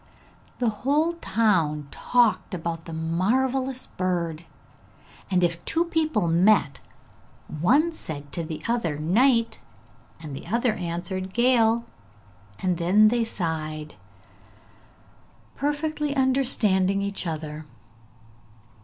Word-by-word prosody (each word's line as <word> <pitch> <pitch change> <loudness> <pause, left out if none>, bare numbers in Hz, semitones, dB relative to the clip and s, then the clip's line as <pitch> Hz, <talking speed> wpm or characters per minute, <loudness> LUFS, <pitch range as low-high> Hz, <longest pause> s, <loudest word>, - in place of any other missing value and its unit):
The 245 -2 +1
whole 305 +5 +2
town 180 - +1
talked 230 -5 +1
about 165 -1 -4
the 165 - -8
marvellous 250 +11 0
bird, 170 -3 -3 0.8
and 180 -2 +2
if 170 0 0
two 335 +1 0
people 310 - 0
met, 170 -2 +3 0.8
one 280 - +3
said 145 - -7
to 170 - -4
the 160 -1 -6
other 230 -11 -1
'Night,' 230 - +2 0.6
and 150 -4 -7
the 135 - -9
other 235 +3 +1
answered 180 +1 -4
'Gale,' 235 -1 +3 0.8
and 180 -2 0
then 200 +5 +5
they 235 0 +1
sighed, 155 -7 -4 1.6
perfectly 295 0 -2
understanding 220 -8 +2
each 200 -2 -4
other. 155 -1 -5
195 Hz, 100 wpm, -25 LUFS, 165-250 Hz, 1.6 s, then